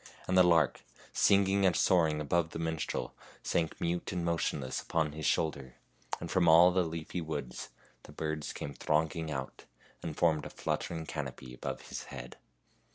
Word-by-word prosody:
And 95 - +1
the 90 - +8
lark, 85 -4 +4 0.3
singing 100 0 +4
and 90 -3 +4
soaring 80 -4 +3
above 80 +2 +1
the - - -6
minstrel, 80 -1 -2 0.3
sank 80 -2 -1
mute 85 +1 -1
and 90 -3 -2
motionless 80 -6 -1
upon 80 -2 0
his 75 0 -3
shoulder, 70 -5 0 0.4
and - - -6
from 90 -2 +3
all 85 +3 +8
the 95 +1 +2
leafy 85 +1 -4
woods 75 -6 -5 0.3
the - - -13
birds 75 -1 -3
came 70 - -6
thronging 80 +3 0
out 65 -3 -5 0.4
and 80 -3 -5
formed 80 -3 +2
a - - -9
fluttering 80 -1 -3
canopy 65 -4 -6
above - - -5
his - - -5
head. - - -9
80 Hz, 160 wpm, -32 LUFS, 75-85 Hz, 0.4 s, the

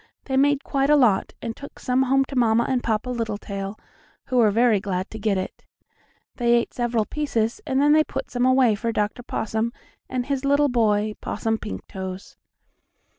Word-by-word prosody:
They 265 - -2
made 280 +1 +3
quite 275 0 0
a 300 - +6
lot, 240 -9 +3
and 230 -1 -4
took 280 - -11
some 255 +1 +1
home 270 +1 +3
to 275 - -8
Mamma 235 -2 +3
and 255 -2 0
Papa 225 +2 -1
Littletail, 205 -3 -4 0.5
who 255 - -1
were 225 -3 +5
very 225 0 +3
glad 190 -1 -3
to 220 - -7
get 205 -2 +1
it. 185 - -5 0.7
They 240 -1 +3
ate 235 - 0
several 240 -3 0
pieces, 235 -6 -1
and 265 0 +1
then 295 +2 +5
put 270 0 -5
some 245 -1 -1
away 255 -3 +4
for 230 +3 -2
Dr. 210 +2 -1
Possum, 220 -1 -2 0.4
and 250 -1 -2
his 275 -1 -2
little 285 +1 +3
boy, 215 -3 +1
Possum 225 0 -2
Pinktoes. 190 -2 -7
235 Hz, 175 wpm, -23 LUFS, 215-265 Hz, 0.7 s, a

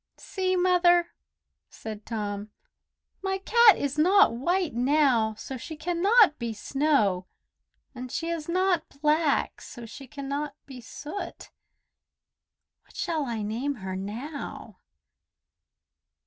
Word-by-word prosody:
"See, 370 -1 -2
Mother," 350 -1 +4 0.6
said 215 -1 -9
Tom. 210 -2 -4 0.7
"My 385 0 -1
cat 445 +3 +6
is 285 +1 -2
not 390 - +5
white 345 +7 0
now, 245 -3 +2
so 260 +5 -7
she 315 +7 -8
cannot 350 +2 +3
be 235 -2 -3
Snow, 215 -7 +1 0.7
and 250 -1 -8
she 330 - -3
is 335 -1 -4
not 365 -1 +1
black, 300 0 +1
so 240 -3 -10
she 270 +4 -11
cannot 280 +2 -4
be 260 -3 -10
Soot. 325 - -8 1.3
What - - -22
shall 320 -5 -1
I 225 -3 -3
name 240 +7 -2
her 190 -4 -6
now?" 230 +10 -7
290 Hz, 115 wpm, -27 LUFS, 230-345 Hz, 1.3 s, cat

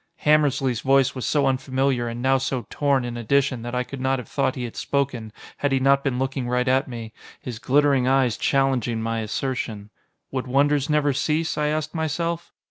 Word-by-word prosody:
Hammersly's 145 -5 +3
voice 135 -1 +3
was 130 - -4
so 145 -2 +2
unfamiliar 130 -1 0
and 120 +1 -5
now 135 0 +3
so 130 -2 -2
torn 140 -3 +1
in 120 -1 -5
addition 130 +1 +1
that 120 +1 -5
I 125 - +1
could 135 +1 -8
not 130 +1 +1
have 125 - -7
thought 135 -2 0
he 125 - -4
had 120 - -6
spoken, 130 -6 -2 0.3
had 145 - 0
he 135 - +2
not 140 +1 +3
been 135 -3 -1
looking 130 -1 -2
right 125 +1 +1
at 130 +1 +2
me, 115 -3 -7 0.3
his 120 -3 -7
glittering 135 +1 +3
eyes 130 -3 +3
challenging 130 -4 +1
my 115 0 -2
assertion. 110 -2 -3 0.4
Would 130 -1 -3
wonders 140 +2 +2
never 150 -2 +2
cease? 155 +4 0
I 150 0 0
asked 155 0 -2
myself. 170 +2 -2
135 Hz, 195 wpm, -23 LUFS, 125-140 Hz, 0.4 s, Hammersly's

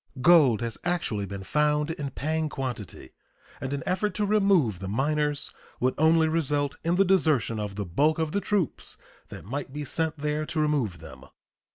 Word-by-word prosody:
Gold 140 -7 +5
has 115 -1 -4
actually 140 - -1
been 100 0 -6
found 150 - +1
in 145 -3 -4
paying 155 +4 -2
quantity, 125 - -6 0.5
and 130 - -3
an 140 -2 -3
effort 185 +2 -1
to 210 - +1
remove 195 - +3
the 95 - -5
miners 145 +6 -1 0.3
would 130 +1 +1
only 160 +1 +4
result 145 -3 0
in 170 +2 +1
the 195 +2 +4
desertion 150 - +2
of 105 -2 -4
the 100 0 -3
bulk 145 - +2
of 160 -2 -1
the 200 - 0
troops 195 -6 -1 0.3
that - - -10
might 135 +5 -5
be 145 +1 -5
sent 160 +1 -1
there 150 +1 -1
to 155 +1 -3
remove 135 - 0
them. 70 -5 -12
150 Hz, 180 wpm, -27 LUFS, 120-160 Hz, 0.5 s, Gold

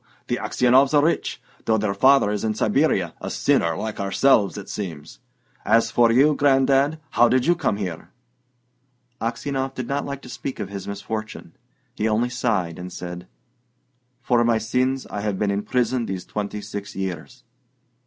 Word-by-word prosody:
The - - +1
Aksionovs 130 +4 +3
are 145 - +5
rich, 170 - -1 0.3
though 110 - +3
their 105 -1 0
father 130 +1 +4
is 105 -1 -2
in 110 -1 0
Siberia: 105 - +1
a - - -4
sinner 85 -1 +1
like 110 -1 -4
ourselves, 100 +1 +2
it 100 - -8
seems! 80 -7 -7 0.4
As 115 0 +3
for 120 -1 +4
you, 140 +6 +5
Gran'dad, 140 +2 +3
how 120 0 +4
did 130 0 +2
you 175 - +5
come 155 - -1
here?" 90 -6 -5 1.1
Aksionov 135 +3 -2
did 125 -2 -4
not 140 +2 -1
like 140 -1 -6
to - - -10
speak 135 +1 -6
of 95 - -4
his 100 -1 -7
misfortune. 110 +2 -6 0.4
He 110 - -1
only 115 +3 +1
sighed, 105 -10 -1
and 90 0 -7
said, 90 0 -7 1.0
"For 120 -3 +3
my 115 -1 +3
sins 125 +4 0
I 105 - -5
have 105 -2 -2
been 105 0 0
in 100 +1 -1
prison 125 0 0
these 95 -2 -4
twenty 105 0 -4
six 105 -1 -7
years." 95 - -5
110 Hz, 170 wpm, -23 LUFS, 100-130 Hz, 1.1 s, are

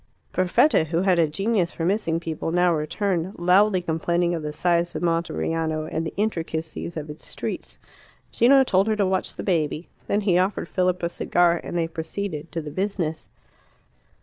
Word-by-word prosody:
Perfetta, 185 - +3
who 165 +3 0
had 185 -3 +3
a 165 - +4
genius 195 +2 0
for 165 - -3
missing 180 -4 +1
people, 165 -1 -4
now 175 0 +3
returned, 175 +3 -1
loudly 185 +2 +4
complaining 170 +1 0
of 165 - -2
the 150 0 -4
size 170 +2 +1
of - - -3
Monteriano 165 -2 -1
and 160 - -1
the 160 - -5
intricacies 165 -5 -3
of 155 -1 -5
its 150 +1 -10
streets. - - -6 0.5
Gino 265 +3 +5
told 195 -5 +2
her 220 - +2
to 205 -2 +1
watch 190 0 -1
the - - -6
baby. 160 -3 -1 0.2
Then 205 - +1
he 185 -4 +3
offered 185 -1 -1
Philip 180 -1 0
a 170 - +1
cigar, 175 0 +2
and 175 - -4
they 165 -1 +1
proceeded 165 0 -5
to 165 - -3
the 150 -1 -7
business. 185 -4 -2
175 Hz, 175 wpm, -24 LUFS, 160-190 Hz, 0.5 s, Gino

